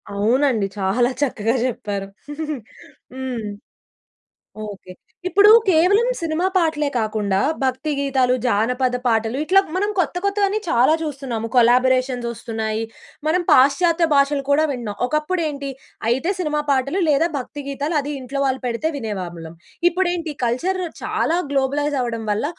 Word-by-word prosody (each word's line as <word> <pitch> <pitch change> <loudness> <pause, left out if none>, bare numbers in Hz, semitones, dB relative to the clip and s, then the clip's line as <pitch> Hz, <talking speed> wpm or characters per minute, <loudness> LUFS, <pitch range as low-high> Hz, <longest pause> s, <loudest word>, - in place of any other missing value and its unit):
అవునండి. 225 +1 +2
చాలా 200 +6 +2
చక్కగా 235 -4 0
చెప్పారు 205 -5 -4 1.1
హ్మ్, 255 -4 -4 1.2
ఓకే. 195 -3 -10 0.4
ఇప్పుడు 405 +3 +6 0.2
కేవలం 375 +7 +4
సినిమా 330 +2 0
పాటలే 315 -4 +1
కాకుండా 215 -3 0 0.2
భక్తి 265 +4 -1
గీతాలు, 265 -3 +2
జానపద 250 +3 +1
పాటలు 225 +1 +1
ఇట్లా 375 +5 +5 0.2
మనం 405 +3 +1
కొత్త 355 - 0
కొత్తవన్నీ 400 +1 +1
చాలా 255 0 +4
చూస్తున్నాం. 270 -7 -4
కొలబొరేషన్స్ 250 +1 +3
ఒస్తున్నాయి. 220 -1 -3 0.4
మనం 350 +4 +2
పాశ్చాత్య 330 +6 +4
భాషలు 280 0 +2
కూడా 290 +2 +4
వింటున్నాం. 230 -6 -5
ఒకప్పుడు 305 +6 -1
ఏంటి 280 -2 -5 0.4
అయితే 265 +10 +1
సినిమా 300 -4 0
పాటలు 275 +6 +1
లేదా 300 +3 +3
భక్తి 285 +3 -6
గీతాలు 285 +4 -3
అది 285 +1 -5
ఇంట్లో 270 +2 -4
వాళ్ళు 265 -1 -1
పెడితే 245 +6 -1
వినేవాళ్ళం. 175 -8 -6 0.3
ఇప్పుడేంటి 350 -3 -1
కల్చర్ 345 +11 0 0.2
చాలా 335 - 0
గ్లోబలైజ్ 285 +1 0
అవ్వడం 230 -2 -3
వల్ల 210 +6 0
265 Hz, 125 wpm, -21 LUFS, 235-315 Hz, 1.2 s, ఇప్పుడు